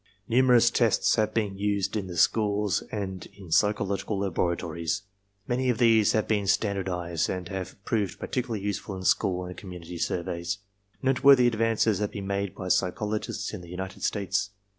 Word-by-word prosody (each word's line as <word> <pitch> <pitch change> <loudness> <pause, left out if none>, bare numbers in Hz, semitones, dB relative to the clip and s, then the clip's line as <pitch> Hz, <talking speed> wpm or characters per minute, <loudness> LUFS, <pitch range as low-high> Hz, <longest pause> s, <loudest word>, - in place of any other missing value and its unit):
Nu 120 +2 +4
merous 120 -2 +5
tests 115 -4 +3
have 110 -1 +2
been 105 -3 -2
used 100 -1 0
in 100 -3 -2
the 90 -2 -7
schools 105 -3 +2
and 95 -3 -4
in 95 -5 -12
psychological 100 +2 +1
laboratories. 85 -1 -1 0.4
Many 125 +1 0
of 120 - +1
these 115 -3 +4
have 110 - +1
been 105 -2 0
standardized 95 -5 0
and 90 -2 -3
have 95 -2 -5
proved 105 -5 -1
particularly 120 -5 -3
useful 100 -1 -3
in 95 - -7
school 90 0 +1
and 90 0 -7
community 90 -3 -8
surveys. 85 +2 -2 0.5
Noteworthy 135 -1 +6
advances 115 -3 +2
have 105 -1 0
been 100 -1 -6
made 100 0 -2
by 95 - -5
psychologists 105 +3 -1
in 105 - -6
the 85 - -12
United 95 +2 -6
States. 100 -1 0
100 Hz, 160 wpm, -27 LUFS, 90-110 Hz, 0.5 s, Noteworthy